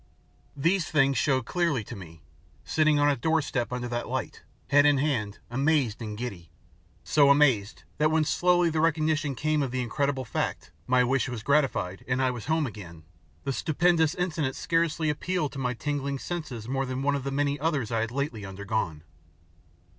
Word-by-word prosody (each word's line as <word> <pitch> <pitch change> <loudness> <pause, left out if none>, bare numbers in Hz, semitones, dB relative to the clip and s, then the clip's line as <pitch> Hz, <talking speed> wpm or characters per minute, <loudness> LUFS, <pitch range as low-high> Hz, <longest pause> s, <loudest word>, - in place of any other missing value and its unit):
These 170 +5 +1
things 140 -3 +3
showed 130 -5 +1
clearly 170 -7 0
to 120 - -8
me, 80 -5 -12 0.4
sitting 155 -1 +2
on 145 0 +4
a 145 - +3
doorstep 140 -4 0
under 125 0 -3
that 120 0 -3
light, - - -4 0.3
head 145 +1 +6
in 145 -1 +4
hand, 125 -8 -1
amazed 135 -3 +1
and 105 -2 -5
giddy 100 -9 -6 0.5
so 145 -2 +4
amazed 135 -7 +3 0.2
that 155 0 +4
when 160 0 +2
slowly 175 +1 +3
the 160 - -1
recognition 155 -3 +1
came 155 +3 0
of 135 - -1
the 130 0 -2
incredible 135 +1 -1
fact - - -3 0.2
my 125 0 +4
wish 130 0 +1
was 120 -3 -5
gratified 135 -10 +1
and 125 0 0
I 130 -1 +2
was 120 -3 -7
home 160 0 +1
again, 90 - -9 0.4
the 135 - -2
stupendous 160 +2 +2
incident 160 -7 -1
scarcely 165 -2 0
appealed 155 0 -2
to 135 - -7
my 125 -1 -1
tingling 140 +1 -2
senses 135 -9 -5
more 135 +1 -1
than 130 +1 -3
one 145 0 +2
of 140 -2 -2
the 140 - -2
many 145 +1 0
others 145 -7 -1
I 115 - +1
had 115 0 -1
lately 125 -4 -3
undergone. 95 -5 -3
140 Hz, 180 wpm, -27 LUFS, 120-155 Hz, 0.5 s, head